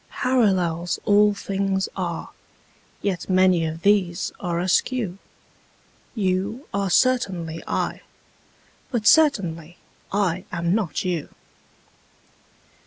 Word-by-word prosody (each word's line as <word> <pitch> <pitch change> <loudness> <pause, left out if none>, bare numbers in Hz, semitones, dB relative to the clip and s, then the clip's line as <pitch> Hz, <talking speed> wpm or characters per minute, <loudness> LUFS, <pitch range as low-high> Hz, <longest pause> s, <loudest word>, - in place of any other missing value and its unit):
Parallels 185 -9 +1
all 205 0 +4
things 195 -1 -1
are: 175 -3 -4 0.7
yet 190 -3 -2
many 185 -2 +4
of 160 +1 -5
these 195 -3 +2
are 175 -2 -2
askew: 190 +2 0 1.0
You 200 +5 -1
are 200 -1 0
certainly 180 -9 +1
I: - - -2 0.9
but 235 -5 -2
certainly 180 - +3 0.3
I 185 -3 0
am 170 0 0
not 200 -4 -1
you. 175 -4 -2
190 Hz, 95 wpm, -23 LUFS, 175-205 Hz, 1.0 s, all